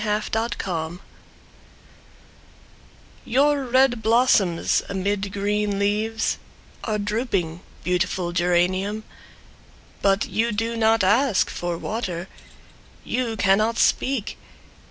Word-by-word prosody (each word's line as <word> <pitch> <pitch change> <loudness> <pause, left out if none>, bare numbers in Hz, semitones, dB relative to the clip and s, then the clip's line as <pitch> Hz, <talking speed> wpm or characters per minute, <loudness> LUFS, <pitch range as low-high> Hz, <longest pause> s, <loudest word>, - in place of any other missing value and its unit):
Mabel 210 -1 +1 0.2
Osborne 175 -7 -4 2.2
Your 280 +2 +2
red 255 -1 +3
blossoms 220 -6 +3
amid 200 0 -2
green 205 0 -1
leaves 215 +3 0 0.4
Are 215 -2 -1
drooping, 205 -6 -2 0.2
beautiful 180 0 0
geranium! 185 +4 +1 1.0
But 195 +1 +2
you 230 +1 0
do 225 +2 -1
not 225 -1 +3
ask 225 +3 +3
for 175 -1 -3
water. 185 -4 -4 0.8
You 235 -3 -2
cannot 215 +4 +2
speak! 260 -3 +1
205 Hz, 90 wpm, -23 LUFS, 185-230 Hz, 2.2 s, red